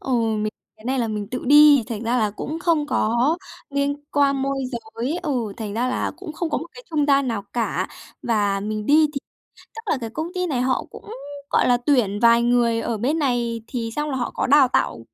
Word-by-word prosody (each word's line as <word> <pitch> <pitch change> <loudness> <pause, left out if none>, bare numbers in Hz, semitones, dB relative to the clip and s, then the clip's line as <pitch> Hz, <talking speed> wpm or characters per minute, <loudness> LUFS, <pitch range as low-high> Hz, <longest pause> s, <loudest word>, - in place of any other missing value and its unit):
Ừ, 265 - -6 0.3
mình 215 +1 -2 0.2
cái 215 - -19
này 260 +1 0
là 230 -2 0
mình 210 -1 -3
tự 250 - -4
đi, 295 -2 +7
thành 225 -1 -4
ra 245 +2 +1
là 215 -2 +1
cũng 300 +9 -5
không 330 -4 +1
có 245 +4 +1 0.3
liên 280 +1 0 0.2
quan 275 -1 +2
môi 275 0 -1 0.2
giới. 235 +7 -4
Ừ, 250 - -2
thành 215 -3 -5
ra 245 +3 0
là 255 - -1
cũng 310 - -8
không 330 +1 -3
có - - +1
một 325 - -7
cái - - -11
trung 300 -2 +1
gian 275 -2 +3
nào 215 -4 -2
cả. 235 -2 -1 0.3
Và 205 -3 +1
mình 215 +1 -4
đi 305 +1 +5
thì 275 - -2 0.6
tức 450 - -6
là - - +1
cái 225 - -4
công 315 +8 -4
ty 365 -1 -1
này 265 -6 -1
họ 255 +1 0
cũng, - - -11 0.4
gọi - - +3
là, 245 -1 +4
tuyển 240 -6 +1
vài 235 0 +5
người 235 -1 +2
ở 230 - -2
bên 280 +9 0
này 240 -4 0
thì 235 -4 -3
xong 300 0 -1
là 270 - -2
họ 245 - -2
có - - -1
đào 275 -1 +6
tạo 240 - 0
250 Hz, 230 wpm, -22 LUFS, 230-290 Hz, 0.6 s, đi